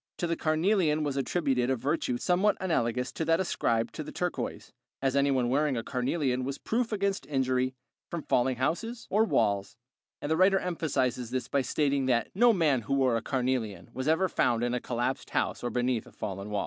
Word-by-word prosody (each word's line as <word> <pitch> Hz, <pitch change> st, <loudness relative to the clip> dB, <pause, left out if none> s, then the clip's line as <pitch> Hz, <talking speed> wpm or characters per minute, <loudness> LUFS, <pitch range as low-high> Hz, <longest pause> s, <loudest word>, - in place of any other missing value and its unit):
To -, -, -1 dB
the 170 Hz, 0 st, 0 dB
carnelian 155 Hz, -1 st, +2 dB
was 145 Hz, -2 st, -2 dB
attributed 135 Hz, -3 st, 0 dB
a 130 Hz, -, +2 dB
virtue 130 Hz, 0 st, -1 dB
somewhat 185 Hz, +8 st, +2 dB
analogous 125 Hz, -8 st, 0 dB
to 160 Hz, -, -3 dB
that 165 Hz, +1 st, +3 dB
ascribed 115 Hz, -10 st, 0 dB
to -, -, -5 dB
the -, -, -8 dB
turquoise, -, -, -4 dB, 0.3 s
as 135 Hz, -1 st, 0 dB
anyone 140 Hz, -3 st, +2 dB
wearing 140 Hz, +1 st, +1 dB
a 115 Hz, -, -2 dB
carnelian 130 Hz, 0 st, -1 dB
was 135 Hz, +1 st, -3 dB
proof 230 Hz, +1 st, -1 dB
against 200 Hz, -2 st, -1 dB
injury 130 Hz, -2 st, 0 dB, 0.3 s
from 170 Hz, -3 st, -4 dB
falling 125 Hz, +1 st, +2 dB
houses 225 Hz, -, -2 dB
or 215 Hz, +3 st, +4 dB
walls; 100 Hz, -, 0 dB, 0.4 s
the 155 Hz, +2 st, 0 dB
writer 190 Hz, +3 st, +5 dB
emphasizes 130 Hz, -9 st, -1 dB
this 130 Hz, 0 st, -2 dB
by 140 Hz, -, +1 dB
stating 140 Hz, +1 st, 0 dB
that 120 Hz, -3 st, +1 dB
"no 240 Hz, +5 st, +5 dB
man 155 Hz, -, +2 dB
who 140 Hz, +5 st, -1 dB
wore 130 Hz, -3 st, +3 dB
a 115 Hz, -, 0 dB
carnelian 125 Hz, -6 st, -2 dB
was 130 Hz, +2 st, -4 dB
ever 160 Hz, +4 st, +3 dB
found 120 Hz, -8 st, +1 dB
in 120 Hz, 0 st, 0 dB
a 125 Hz, -, 0 dB
collapsed 120 Hz, +2 st, -2 dB
house -, -, -1 dB
or 120 Hz, -, -1 dB
beneath 125 Hz, -1 st, -1 dB
a -, -, -14 dB
fallen 100 Hz, +1 st, -5 dB
wall." 105 Hz, -1 st, -1 dB
135 Hz, 195 wpm, -29 LUFS, 125-165 Hz, 0.4 s, writer